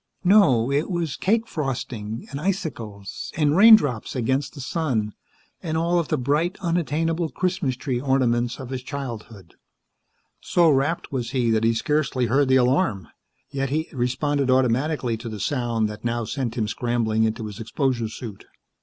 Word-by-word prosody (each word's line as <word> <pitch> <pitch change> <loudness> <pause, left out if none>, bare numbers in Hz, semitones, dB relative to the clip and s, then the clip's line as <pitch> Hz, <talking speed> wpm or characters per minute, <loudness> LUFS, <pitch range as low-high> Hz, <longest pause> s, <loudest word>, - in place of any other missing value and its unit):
No, 160 - +5
it 145 +6 0
was 170 -5 -2
cake 225 +4 +1
frosting, 120 - -4
and 140 +1 -5
icicles, 120 - -4
and 150 -1 +2
raindrops 185 - +6
against 130 +4 -1
the - - -9
sun, 130 - -1 0.5
and 160 -2 -2
all 170 +2 +2
of 165 - -2
the - - 0
bright, 150 +8 0
unattainable 165 -1 0
Christmas 175 -3 -1
tree 125 -1 -3
ornaments 125 -3 +1
of 130 -1 -7
his 130 -1 -3
childhood. 115 - -7 0.9
So 170 -3 +3
rapt 140 +5 0
was 125 -2 -3
he 120 -3 +1
that 110 0 +2
he 115 0 +3
scarcely 150 -2 0
heard 135 +4 +2
the 130 - +4
alarm. 125 - +2 0.4
Yet 135 -1 -2
he 155 +3 -1
responded 135 +2 0
automatically 130 0 +1
to 115 +1 -7
the 110 -1 -6
sound 120 -1 0
that 105 - -9
now 120 0 -1
sent 120 0 -3
him 110 -2 0
scrambling 115 -1 0
into 110 0 -1
his 105 -2 -8
exposure 120 0 -1
suit. 110 -3 -9
130 Hz, 160 wpm, -23 LUFS, 115-155 Hz, 0.9 s, raindrops